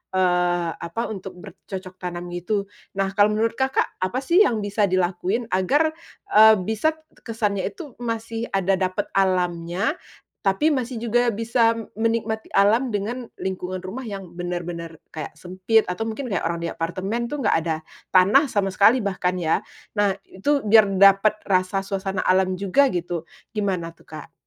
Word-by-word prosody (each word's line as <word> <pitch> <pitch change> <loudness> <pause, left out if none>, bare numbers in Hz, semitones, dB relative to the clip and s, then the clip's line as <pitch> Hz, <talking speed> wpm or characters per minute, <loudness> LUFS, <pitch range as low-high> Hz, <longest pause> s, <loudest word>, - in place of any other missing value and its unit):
eee, 180 -2 +2
apa 170 +9 -4
untuk 190 -3 -7
bercocok 185 +1 -9
tanam 175 -1 -5
gitu, 200 +3 -2 0.3
nah 195 0 +1
kalau 205 +1 +5
menurut 225 +2 0
Kakak 265 0 +1 0.2
apa 235 +7 -1
sih 340 +7 +4
yang 230 - +3
bisa 205 0 +1
dilakuin 185 +5 -1
agar, 280 - +2 0.4
eee, 220 +1 +8
bisa 220 - 0 0.3
kesannya 210 -4 -1
itu 310 -6 -8
masih 230 -1 -3
ada 195 0 +1
dapet 185 -1 0
alamnya, 180 - 0 0.5
tapi 195 +12 +3
masih 250 -4 -2
juga 240 +1 +3
bisa 230 +1 +2 0.2
menikmati 225 -1 -1
alam 215 +6 +4
dengan 235 +5 -3
lingkungan 185 -1 -4
rumah 210 +8 -6
yang 195 -4 -7
bener-bener 175 -1 -5 0.2
kayak 155 -2 -7
sempit 185 +6 +1
atau 225 +5 -3
mungkin 230 +1 -4
kayak 190 - -1
orang 170 0 -3
di 170 - -2
apartemen 190 +8 -3
tuh 285 +2 -4
enggak 205 - +3
ada 160 -1 0 0.4
tanah 210 +11 +6
sama 200 -5 0
sekali 220 +6 +4
bahkan 185 -2 -1
ya, 165 -3 +1 0.3
nah 205 -2 +1
itu 280 +9 -1
biar 215 0 +6
dapet 195 +2 +6
rasa 185 0 +1
suasana 195 -1 -3
alam 185 0 +2
juga 200 +9 +3
gitu 175 -5 -3 0.2
gimana 190 -6 -2
tuh 165 - -24
Kak? 155 -1 -10
195 Hz, 155 wpm, -23 LUFS, 180-225 Hz, 0.5 s, eee